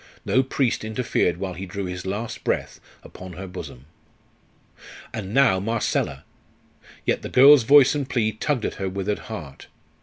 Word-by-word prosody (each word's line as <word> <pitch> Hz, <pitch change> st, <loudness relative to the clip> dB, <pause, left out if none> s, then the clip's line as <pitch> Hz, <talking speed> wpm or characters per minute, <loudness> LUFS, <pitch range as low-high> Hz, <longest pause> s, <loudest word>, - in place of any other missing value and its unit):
No 130 Hz, -, +3 dB
priest 130 Hz, -3 st, -1 dB
interfered 110 Hz, -6 st, 0 dB
while 95 Hz, 0 st, -4 dB
he 95 Hz, +3 st, -7 dB
drew 100 Hz, +2 st, -5 dB
his 90 Hz, 0 st, -6 dB
last 105 Hz, +4 st, -4 dB
breath -, -, -2 dB, 0.2 s
upon 95 Hz, -1 st, -11 dB
her 95 Hz, +2 st, -7 dB
bosom. 90 Hz, -8 st, -9 dB, 1.3 s
And 100 Hz, -3 st, -5 dB
now 120 Hz, -6 st, +4 dB
Marcella! 115 Hz, +3 st, -1 dB, 0.8 s
Yet -, -, 0 dB
the -, -, -6 dB
girl's 140 Hz, +2 st, +8 dB
voice 140 Hz, +1 st, +7 dB
and 140 Hz, -2 st, -3 dB
plea 110 Hz, -5 st, +1 dB
tugged 120 Hz, +3 st, -2 dB
at -, -, -2 dB
her 95 Hz, -, -1 dB
withered 100 Hz, +2 st, -3 dB
heart. 80 Hz, -11 st, -8 dB
105 Hz, 155 wpm, -23 LUFS, 95-125 Hz, 1.3 s, girl's